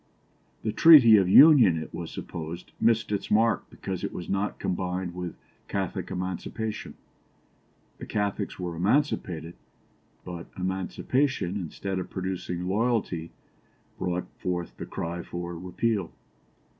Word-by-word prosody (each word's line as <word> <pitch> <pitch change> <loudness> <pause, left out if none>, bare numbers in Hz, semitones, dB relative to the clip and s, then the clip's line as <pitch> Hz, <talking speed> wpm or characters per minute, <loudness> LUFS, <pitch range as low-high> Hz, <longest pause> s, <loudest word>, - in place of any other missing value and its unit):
The 110 - 0
Treaty 125 -4 +8
of 95 -2 +3
Union, 125 - +8
it 80 - -6
was - - -5
supposed, 85 +2 -7
missed 115 -2 +2
its 100 - -2
mark 115 +2 +2
because - - -5
it - - -2
was 90 - -7
not 100 +1 -1
combined 90 0 -2
with 90 -1 -5 0.3
Catholic - - -3
Emancipation. 95 +4 -4 1.0
The - - -8
Catholics 105 -1 -2
were 90 -2 -4
emancipated, 90 - 0 0.7
but 85 -1 -7
emancipation, 95 +4 -1
instead 95 +1 -4
of 90 - -5
producing 90 -1 -4
loyalty, 100 -5 0 0.7
brought 90 0 -1
forth 90 -1 -3
the - - -6
cry 85 +1 -4
for 85 0 -6
repeal. 95 +2 -1
95 Hz, 120 wpm, -27 LUFS, 90-110 Hz, 1.0 s, Treaty